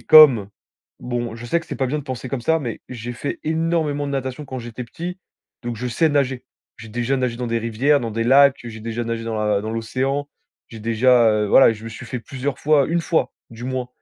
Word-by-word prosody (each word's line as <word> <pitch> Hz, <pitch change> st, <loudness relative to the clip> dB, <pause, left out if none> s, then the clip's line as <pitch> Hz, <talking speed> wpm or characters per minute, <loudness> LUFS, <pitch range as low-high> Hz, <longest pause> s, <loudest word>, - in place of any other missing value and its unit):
comme, 135 Hz, -10 st, +8 dB, 0.5 s
bon, 120 Hz, -2 st, -3 dB
je 115 Hz, -, -9 dB
sais 170 Hz, +8 st, +1 dB
que 165 Hz, -, -15 dB
c'est -, -, -5 dB
pas 135 Hz, -, 0 dB
bien 145 Hz, +4 st, -1 dB
de -, -, -5 dB
penser 130 Hz, -2 st, -5 dB
comme 135 Hz, -1 st, -3 dB
ça, 160 Hz, +7 st, +2 dB
mais 120 Hz, -7 st, -5 dB
j'ai 120 Hz, -1 st, -6 dB
fait 130 Hz, +4 st, -4 dB
énormément 160 Hz, -2 st, 0 dB
de 140 Hz, -, -4 dB
natation 130 Hz, +1 st, -3 dB
quand 130 Hz, -1 st, -5 dB
j'étais 120 Hz, +1 st, -7 dB
petit 175 Hz, +9 st, -6 dB, 0.4 s
donc 120 Hz, -1 st, -4 dB
je 125 Hz, +3 st, -4 dB
sais 160 Hz, +7 st, +2 dB
nager. 135 Hz, -4 st, 0 dB, 0.3 s
J'ai 115 Hz, -, -10 dB
déjà 120 Hz, +4 st, -1 dB
nagé 125 Hz, -3 st, -1 dB
dans 125 Hz, -1 st, -3 dB
des 115 Hz, 0 st, 0 dB
rivières, 115 Hz, +6 st, +2 dB
dans 115 Hz, -3 st, -4 dB
des 115 Hz, -, -1 dB
lacs, 140 Hz, +1 st, +5 dB
heu, 120 Hz, -, -6 dB
j'ai 110 Hz, -1 st, -9 dB
déjà 115 Hz, +1 st, -3 dB
nagé 115 Hz, 0 st, -3 dB
dans 115 Hz, -, -3 dB
la 105 Hz, -1 st, +1 dB
dans 110 Hz, +2 st, -4 dB
l'océan. 130 Hz, +5 st, -2 dB, 0.4 s
J'ai 115 Hz, -2 st, -10 dB
déjà, 115 Hz, +1 st, +4 dB
heu, 105 Hz, 0 st, +1 dB
voilà, 120 Hz, +2 st, +7 dB
je 110 Hz, 0 st, -10 dB
me -, -, -5 dB
suis 120 Hz, +2 st, -9 dB
fait 125 Hz, +2 st, -4 dB
plusieurs 135 Hz, +2 st, -4 dB
fois 150 Hz, -2 st, +3 dB
1 170 Hz, +1 st, +1 dB
fois, 165 Hz, +1 st, 0 dB, 0.2 s
du 115 Hz, +1 st, -9 dB
moins, 130 Hz, -1 st, -3 dB
125 Hz, 240 wpm, -21 LUFS, 115-140 Hz, 0.5 s, comme